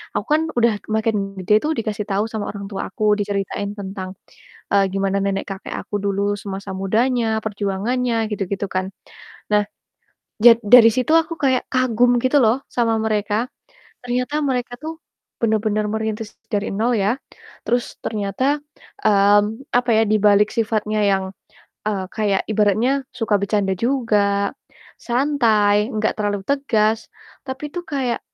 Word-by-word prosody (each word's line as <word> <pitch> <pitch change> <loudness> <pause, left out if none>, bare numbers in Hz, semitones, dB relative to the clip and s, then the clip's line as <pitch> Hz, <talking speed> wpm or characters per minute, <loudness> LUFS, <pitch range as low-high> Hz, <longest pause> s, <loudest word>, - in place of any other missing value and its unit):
aku - - -1
kan 310 - +3 0.2
udah 235 -2 +4 0.2
makin 220 0 +1 0.3
gede 210 +3 +2
tuh, 305 - 0
dikasih 215 -1 -3
tau 200 +2 +1
sama 215 -2 -3
orang 200 -1 -7
tua 195 - -3
aku, 215 - -5 0.2
diceritain 200 0 -2
tentang, 190 -1 -6 0.6
eee, 200 -1 +5
gimana 195 0 0
nenek-kakek 195 0 -4
aku 205 - -7
dulu 200 0 0
semasa 195 0 -6
mudanya, 225 +2 +1
perjuangannya, 215 +4 -1 0.2
gitu 205 -1 -1
gitu 200 +1 -2
kan. 185 0 +1 0.7
Nah, 210 0 +4 0.8
jad 235 -1 +9
dari 230 +1 +8
situ 255 +4 0
aku 325 +1 -7
kayak 260 -2 +3
kagum 245 -1 +3
gitu 255 +3 +3
loh 225 +3 +4
sama 230 -2 +1
mereka, 215 +2 0 0.6
ternyata 250 +3 -2
mereka 250 -3 -1
tuh 320 +1 -6 0.4
bener-bener 215 -1 +1
merintis 220 -1 -3 0.2
dari 205 0 0
nol, 225 +5 +1
ya. 205 +6 +1 0.5
Terus 245 0 -1
ternyata, 225 +7 -1 0.5
mmm, 205 +4 +3
apa 245 0 0
ya, 220 - +4
di 215 - +3
balik 205 +1 +5
sifatnya 215 -1 0
yang, 190 -1 +1 0.6
eee, 200 -3 -1
kayak 205 -3 +1
ibaratnya 215 +4 +2 0.2
suka 220 -3 0
bercanda 200 -1 0
juga, 205 -4 +1 0.5
santai 230 -5 +2
enggak 215 0 0
terlalu 205 -2 -1
tegas, 225 -6 +1 0.4
tapi 270 +3 -5
itu 355 - -3
kayak, 265 -6 -1
215 Hz, 140 wpm, -21 LUFS, 200-245 Hz, 0.8 s, jad